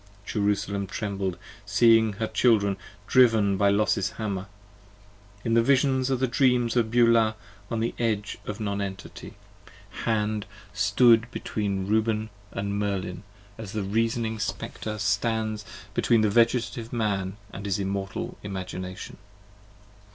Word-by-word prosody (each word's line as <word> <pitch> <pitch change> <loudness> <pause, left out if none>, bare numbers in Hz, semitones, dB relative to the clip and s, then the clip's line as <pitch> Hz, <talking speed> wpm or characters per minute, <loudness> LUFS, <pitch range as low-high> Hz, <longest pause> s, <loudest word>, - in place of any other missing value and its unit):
Jerusalem 100 -1 -1
trembled 100 -4 -3 0.3
seeing 110 +1 +4
her 110 +3 -2
Children 105 -4 +3 0.3
driv'n 110 -5 +4
by 100 +1 +3
Los's 100 -1 +1
Hammer, 100 -4 -4 1.0
In 115 - +1
the 115 - +5
visions 130 +1 +2
of 130 -2 +1
the 130 - +2
dreams 125 -2 +2
of 115 -2 +2
Beulah, 115 -2 +4 0.3
on 115 -1 -1
the 115 - -1
edge 110 -3 -1
of 105 +1 -4
Non 100 -2 -2
Entity. 95 -1 -7 0.6
40 - - -8
Hand 105 -2 0 0.3
stood 110 +3 +4
between 100 -5 -2
Reuben 110 +1 0
& 100 0 -27
Merlin, 100 -2 -2 0.4
as 105 -3 -7
the 105 -2 -2
Reasoning 110 +2 0
Spectre 110 +1 -4
Stands 110 +1 -1 0.3
between 115 +1 +3
the 105 -1 +2
Vegetative 115 0 +1
Man 100 -4 -1 0.2
& 100 - -7
his 100 -2 -1
Immortal 95 -1 -4
Imagination. 95 -2 -6
105 Hz, 130 wpm, -26 LUFS, 100-115 Hz, 1.0 s, the